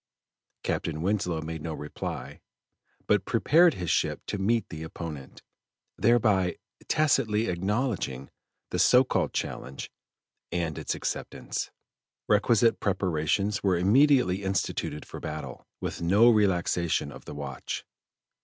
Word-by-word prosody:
Captain 80 0 -2
Winslow 90 -4 0
made 80 0 -5
no 80 0 -4
reply, 75 0 -6 0.6
but - - +3
prepared 170 +1 +4
his 90 -3 -2
ship - - +1
to 100 - -3
meet 115 +4 +1
the 80 -2 -7
opponent, 80 -4 -8 0.5
thereby 105 -6 +3 0.3
tacitly 120 -8 +2
acknowledging 95 - -2 0.4
the - - -1
so 125 +1 +6
called 130 - 0
challenge 70 - -5 0.6
and 85 -3 -2
its - - -2
acceptance. - - -4 0.6
Requisite 115 +2 +3
preparations 95 +1 0
were 95 -3 +2
immediately 105 0 +4
instituted 95 -5 -2
for - - -8
battle, 75 0 -7
with - - -4
no 100 +8 +6
relaxation 90 -7 +1
of 65 - -12
the - - -8
watch. 70 -2 -5
95 Hz, 115 wpm, -28 LUFS, 80-110 Hz, 0.6 s, so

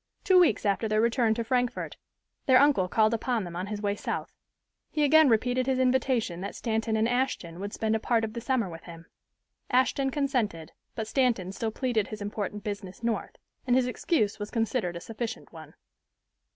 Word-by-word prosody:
Two 380 -3 +6
weeks 345 -9 +3
after 205 +2 +1
their 215 0 +1
return 230 0 +2
to 230 - -2
Frankfort 250 +1 -1 0.5
their 260 -1 +7
uncle 275 -10 +4
called 215 +4 +3
upon 230 -1 0
them 175 -2 -7
on 180 +2 -3
his 210 0 -5
way 205 0 0
South. - - -4 0.6
He 300 - 0
again 310 0 +6
repeated 245 +3 +1
his 265 -1 +1
invitation 255 -8 +1
that 200 - -5
Stanton 225 -1 -1
and 220 +1 +2
Ashton 240 -9 -1
would 200 +1 -4
spend 220 0 0
a - - 0
part 230 0 +1
of 220 -1 -3
the 235 - -5
summer 245 -3 0
with 165 -2 -10
him. 165 -1 -11 0.6
Ashton 260 +2 +2
consented, 250 - -1 0.2
but 220 - -3
Stanton 225 -6 +1
still 220 +3 -3
pleaded 225 -2 -1
his 215 - -7
important 205 0 -4
business 200 -1 -6
North, 230 -1 -2 0.3
and 245 - +4
his 255 -1 +3
excuse 240 - 0
was 205 0 -5
considered 225 -6 -1
a - - -4
sufficient 225 +4 -6
one. - - -12
225 Hz, 190 wpm, -28 LUFS, 205-255 Hz, 0.6 s, their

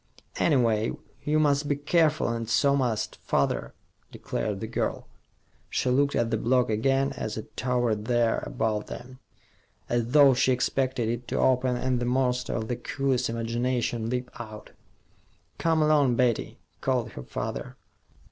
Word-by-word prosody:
"Anyway, 115 -7 +2 0.3
you 150 +1 +1
must 145 -1 +2
be 145 - +1
careful, 155 +1 +2
and 115 -1 -3
so 140 +3 +3
must 120 -6 -1
father," - - -1 0.4
declared 105 -3 -3
the 110 - -4
girl. 115 - -3 0.6
She 125 - 0
looked 140 +2 +2
at 115 -1 +1
the 115 - +2
block 125 0 +2
again, 135 +5 +1
as 110 -5 -4
it 110 - -8
towered 120 -4 0
there 120 -1 +2
above 110 -1 -1
them, 130 +1 -9 0.7
as 120 -1 0
though 140 +1 +6
she 130 +1 +2
expected 130 -1 0
it 120 +1 -3
to - - -2
open 130 -1 +2
and 125 0 0
the 120 - -2
monster 125 0 0
of 110 -1 -2
the 120 - -2
coolies' 130 0 -1
imagination 115 0 -1
leap 125 0 -3
out. 110 -2 -9 0.9
"Come 160 -2 +2
along, 145 -5 +4
Betty," 120 -2 0 0.2
called 125 -4 0
her 65 - -8
father. 65 - -5
125 Hz, 150 wpm, -27 LUFS, 115-135 Hz, 0.9 s, though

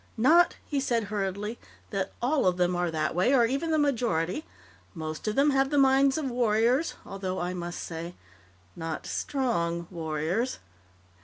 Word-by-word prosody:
"Not," 330 - +5
he 285 - -1
said 240 -4 0
hurriedly, 205 +3 -2 0.3
"that 195 -2 -2
all 270 -4 +2
of 180 -1 +2
them 180 0 +2
are 175 0 0
that 155 -2 -1
way 185 +10 +3
or 240 -3 +5
even 275 +7 -1
the 315 - +2
majority. 240 - 0 0.5
Most 155 +3 -5
of 215 - 0
them 285 +2 +4
have 270 0 +2
the 290 - 0
minds 270 0 +4
of 280 -5 -2
warriors, 240 +5 +2
although, 190 -1 -4
I 175 +1 -2
must 175 -1 -5
say, 170 +1 -6 0.6
not 165 -2 -4
_strong__ 170 -11 -1
warriors." 165 +8 -2
215 Hz, 160 wpm, -28 LUFS, 175-270 Hz, 0.6 s, Not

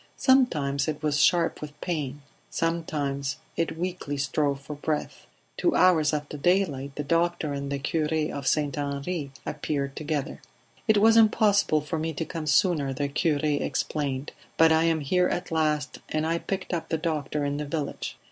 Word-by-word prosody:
Sometimes 150 - +3
it 155 0 -3
was 150 -1 +2
sharp 170 -2 +3
with 150 -1 -8
pain; 145 -5 -3 0.3
sometimes 145 -5 -2 0.2
it 165 -1 -1
weakly 175 -5 -3
strove 140 0 0
for 150 +2 -8
breath. 150 +1 -3 0.3
Two 345 - +2
hours 165 -5 +5
after 150 -1 -3
daylight 145 -5 +1
the 150 - -3
doctor 165 -1 0
and 140 0 -4
the 140 - 0
cure 150 +2 -1 0.2
of 140 -2 -4
St. 145 -1 +1
Henri 140 +2 -3 0.2
appeared 140 -2 -3
together. 150 -1 -3 0.5
"It 220 -1 +5
was 225 +2 +6
impossible 210 -7 +4
for 155 +2 -3
me 160 +1 -2
to 160 +2 -3
come 160 -2 -5
sooner," 150 -3 +3
the 140 +2 -2
cure 150 0 +1
explained, 145 -1 -1 0.3
"but 165 0 +6
I 160 +1 +4
am 165 -2 +2
here 180 +6 +2
at 180 0 -3
last, 150 -2 0
and 155 0 0
I 165 +1 0
picked 190 0 -4
up 170 - -3
the 160 - +1
doctor 150 -3 -2
in 145 0 -1
the 150 - -3
village." 145 0 -4
150 Hz, 170 wpm, -26 LUFS, 140-165 Hz, 0.5 s, was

